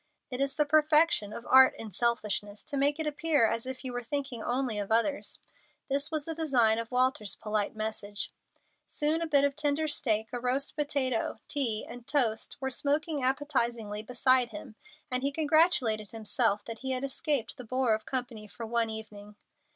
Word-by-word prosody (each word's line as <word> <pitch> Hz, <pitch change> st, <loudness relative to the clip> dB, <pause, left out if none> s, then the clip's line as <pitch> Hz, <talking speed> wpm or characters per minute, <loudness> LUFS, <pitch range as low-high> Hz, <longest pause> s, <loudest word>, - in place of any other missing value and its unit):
It 250 Hz, +1 st, -3 dB
is 275 Hz, 0 st, 0 dB
the 300 Hz, -, +2 dB
perfection 305 Hz, -6 st, +4 dB
of 235 Hz, -, -8 dB
art 260 Hz, 0 st, +7 dB
in 220 Hz, -2 st, -7 dB
selfishness 210 Hz, -2 st, -1 dB
to 300 Hz, -, -5 dB
make 285 Hz, +2 st, +3 dB
it 315 Hz, -, -1 dB
appear 300 Hz, -4 st, +2 dB
as 230 Hz, +3 st, -3 dB
if 260 Hz, 0 st, -6 dB
you 255 Hz, -, -4 dB
were 245 Hz, -, -3 dB
thinking 270 Hz, -1 st, -3 dB
only 245 Hz, -2 st, -1 dB
of 205 Hz, +1 st, -4 dB
others. 235 Hz, +6 st, +1 dB, 0.5 s
This 280 Hz, +3 st, 0 dB
was 310 Hz, -3 st, -3 dB
the 325 Hz, -, -3 dB
design 250 Hz, -9 st, +3 dB
of 230 Hz, -1 st, -5 dB
Walter's 250 Hz, -5 st, +1 dB
polite 210 Hz, -1 st, -2 dB
message. 215 Hz, -1 st, -3 dB, 0.6 s
Soon 305 Hz, +2 st, +1 dB
a 335 Hz, -, -1 dB
bit 285 Hz, -3 st, +3 dB
of 285 Hz, -1 st, +1 dB
tender 305 Hz, +1 st, 0 dB
steak, 220 Hz, -7 st, +1 dB
a 245 Hz, -, -2 dB
roast 255 Hz, +3 st, -1 dB
potato, 280 Hz, -5 st, -1 dB
tea, 235 Hz, -7 st, 0 dB
and 245 Hz, -1 st, -10 dB
toast 230 Hz, -7 st, 0 dB
were 265 Hz, 0 st, -3 dB
smoking 290 Hz, +3 st, -1 dB
appetizingly 240 Hz, -6 st, -1 dB
beside 250 Hz, +2 st, +2 dB
him, 310 Hz, -3 st, -9 dB, 0.4 s
and 255 Hz, 0 st, +1 dB
he 280 Hz, +1 st, 0 dB
congratulated 290 Hz, -, +2 dB
himself 225 Hz, -1 st, 0 dB
that 230 Hz, -1 st, -7 dB
he 265 Hz, 0 st, -2 dB
had 255 Hz, +1 st, -2 dB
escaped 275 Hz, -3 st, -1 dB
the 250 Hz, -, -8 dB
bore 255 Hz, 0 st, +1 dB
of 215 Hz, 0 st, -3 dB
company 245 Hz, -5 st, -4 dB
for 230 Hz, +3 st, -8 dB
one 230 Hz, 0 st, 0 dB
evening. 210 Hz, -1 st, -7 dB
255 Hz, 180 wpm, -29 LUFS, 220-285 Hz, 0.6 s, art